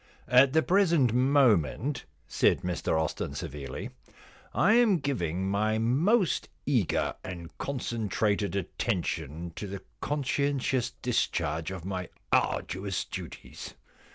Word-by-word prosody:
* - - -30
At 135 0 +2
the 160 0 +4
present 170 - +3
moment,' 130 - +2 0.2
said - - +2
Mr 90 -3 -1
Austin 80 - -2
severely, 70 -2 -6 0.4
* - - -25
I 200 +5 +4
am 230 -5 +5
giving 95 - -2
my 105 +2 +1
most 165 - +2 0.2
eager 120 - +1
and 85 -2 -8
concentrated 110 -6 -1
attention 85 - -3
to 105 - -4
the 100 0 -7 0.2
conscientious 140 -3 0
discharge 80 -9 0
of 95 -3 -7
my 95 -2 -4 0.2
arduous 95 +2 0
duties. - - -8
110 Hz, 115 wpm, -29 LUFS, 90-140 Hz, 0.4 s, am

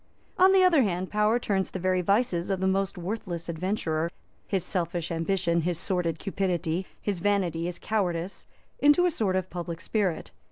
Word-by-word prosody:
On 375 +1 +7
the 385 -1 +6
other 340 -6 +5
hand, 185 -4 -1
power 210 +2 +3
turns 195 -5 -1
the - - -5
very 185 0 +1
vices 195 -2 +1
of 190 -2 0
the 190 - 0
most 195 0 0
worthless 175 -2 -4
adventurer, 170 -2 -1 0.4
his 190 -4 0
selfish 175 -2 -2
ambition, 170 0 +1
his 175 0 -1
sordid 175 -3 -1
cupidity, 180 -2 -1
his 200 -4 -2
vanity, 180 -4 0
his 175 0 -3
cowardice, 185 -4 -2 0.3
into 295 +5 +5
a 355 - +3
sort 205 - 0
of 185 0 -2
public 170 -2 -5
spirit. 195 -3 -1
185 Hz, 170 wpm, -27 LUFS, 170-205 Hz, 0.4 s, On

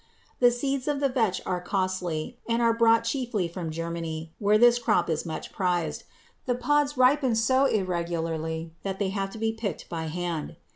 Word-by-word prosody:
The 245 - +7
seeds 270 +2 -2
of 290 -1 0
the 280 -1 +2
vetch 225 -8 0
are 180 -1 -1
costly 185 -2 -2
and 230 0 +2
are 230 -1 +4
brought 230 0 +4
chiefly 230 -6 -1
from 170 -1 -5
Germany, 165 0 -4
where 210 0 +4
this 240 +1 +6
crop 210 -8 +2
is 160 +2 -2
much 160 - -5
prized. 175 -3 -1 0.4
The 245 - +2
pods 290 +3 +1
ripen 255 -1 +4
so 260 +4 +3
irregularly 165 - -2
that 195 -1 -3
they 195 -1 0
have 195 0 -2
to 210 - -10
be 225 0 0
picked 220 -6 -5
by 165 -2 -3
hand. 170 -1 -3
195 Hz, 180 wpm, -27 LUFS, 170-240 Hz, 0.4 s, The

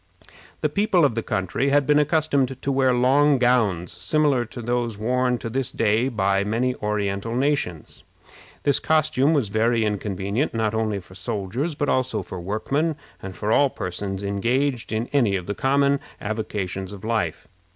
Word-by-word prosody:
The - - +2
people 200 -5 +3
of 140 - +2
the 115 - -1
country 95 +8 -1
had 145 0 +3
been 150 +1 +4
accustomed 145 -4 +1
to 140 - 0
wear 135 -1 +3
long 135 +4 +4
gowns, 110 -9 +2
similar 125 - +1
to 120 - -10
those 120 -2 -1
worn 125 +3 +1
to 115 - -6
this 130 +2 -2
day 115 +3 +1
by 100 -4 +1
many 115 +5 0
Oriental 105 +1 -2
nations. 130 - -1 0.6
This 140 -1 +3
costume 155 -2 +2
was 130 -9 +1
very 115 +2 +2
inconvenient, 105 - -2
not 110 -1 0
only 110 -2 0
for 90 0 -15
soldiers, 105 - -3
but 145 - -1
also 130 -7 0
for 90 0 -7
workmen, 140 - -1 0.3
and 95 -1 -7
for 105 +1 -2
all 140 +4 +4
persons 95 -1 -4
engaged 120 +6 0
in 110 +1 -1
any 120 -9 +3
of 90 -2 -3
the 100 - -3
common 140 +3 +2 0.2
avocations 100 -3 -4
of 100 -2 -10
life. 110 -8 -2
115 Hz, 165 wpm, -23 LUFS, 100-135 Hz, 0.6 s, been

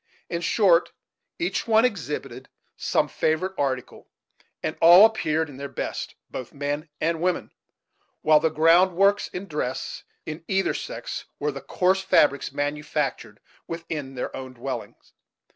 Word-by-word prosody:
In 170 0 -2
short, 180 -1 +3 0.4
each 350 -6 -2
one 225 +1 +5
exhibited 180 -11 -4 0.3
some - - +1
favorite 160 +5 0
article, 130 -5 -3 0.5
and - - -2
all 175 +5 +10
appeared 160 -8 +1
in 140 -3 -11
their 140 0 -6
best, 135 - -5 0.2
both 130 +1 -7
men 145 +3 -3
and 165 0 0
women; 180 0 -1 0.7
while 155 0 +6
the 160 +1 +2
ground 165 +4 +4
works 200 +2 +3
in 180 +2 -6
dress, 150 -6 -4 0.2
in 160 +1 -6
either 195 0 +1
sex, - - -6
were 150 +1 -1
the 140 -1 -8
coarse 185 +1 +1
fabrics 145 -8 +3
manufactured 145 +1 -3 0.3
within 160 -5 -5
their 125 - -4
own 130 -1 -7
dwellings. 125 0 -7
160 Hz, 140 wpm, -25 LUFS, 145-185 Hz, 0.7 s, all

